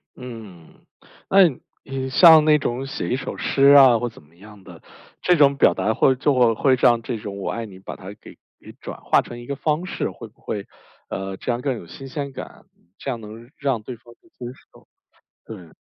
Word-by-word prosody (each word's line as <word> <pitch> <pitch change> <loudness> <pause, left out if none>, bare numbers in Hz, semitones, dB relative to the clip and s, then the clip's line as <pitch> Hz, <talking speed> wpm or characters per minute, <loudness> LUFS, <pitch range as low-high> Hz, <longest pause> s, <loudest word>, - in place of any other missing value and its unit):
嗯， 110 -9 -12 0.4
那 195 - +6 0.4
你 135 -1 -5
像 160 +1 +7
那 150 -1 +5
种 130 +1 -3
写 135 - -5
一 125 - +1
首 140 - -6
诗 135 - -1
啊 130 -4 +8
或 120 0 -2
怎 110 - -17
么 80 +3 -26
样 105 +1 -16
的， - - -14 0.4
这 180 - +3
种 140 -2 +4
表 - - +5
达 110 - -1
会 130 +3 +3
就 125 -4 +2
会 130 +3 +3
让 120 -2 +3
这 115 0 -4
种 100 -1 -7
“我 - - -3
爱 115 0 -4
你” 95 -3 -13
把 - - -8
它 95 +1 -10
给 - - -14 0.2
给 - - -14
转 - - -9
化 - - +3
成 120 - -10
一 120 - -11
个 140 - -3
方 155 +5 -1
式， - - -3
会 115 - -11
不 110 - -27
会， 100 -2 -5 0.4
呃， 95 0 -5
这 - - -3
样 120 - -3
更 135 -1 -1
有 85 -7 -10
新 135 - -10
鲜 140 0 -5
感？ - - -10 0.3
这 140 - -5
样 120 - -3
能 110 +3 -11
让 135 -7 -1
对 125 +3 -8
方 120 +1 -18
去 170 - -26
接 125 - -11 0.3
受， - - -21 0.6
对。 90 -8 -11
120 Hz, 230 characters per minute, -22 LUFS, 110-135 Hz, 0.6 s, 啊